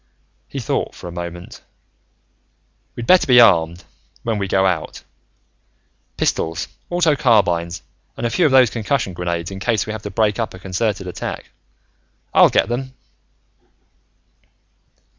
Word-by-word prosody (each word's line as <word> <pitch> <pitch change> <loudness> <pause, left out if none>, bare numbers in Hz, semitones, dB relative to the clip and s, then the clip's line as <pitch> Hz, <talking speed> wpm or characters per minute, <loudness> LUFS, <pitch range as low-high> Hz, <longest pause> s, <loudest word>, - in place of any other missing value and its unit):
He - - -9
thought - - -2
for - - -9
a - - -7
moment. 85 0 -8 1.3
"We'd 120 - -5
better 185 +5 +5
be 125 -2 +7
armed, 85 -6 +4 0.4
when 115 -2 -1
we 100 - -2
go 95 0 +2
out. 90 -4 -2 1.1
Pistols, 80 +1 -1 0.2
auto 170 -4 +2
carbines, 90 - +1 0.3
and 120 - -3
a 115 - 0
few 175 -4 +3
of - - -1
those 130 -4 +5
concussion 115 -3 -1
grenades 85 0 -3
in 95 - -7
case 110 0 0
we 110 - -5
have 110 - -6
to 105 - -6
break 110 0 0
up 115 -4 -3
a - - -10
concerted 95 +2 -2
attack. 90 - -6 0.8
I'll - - +7
get - - +2
them." 130 +2 -4
105 Hz, 140 wpm, -20 LUFS, 90-120 Hz, 1.3 s, be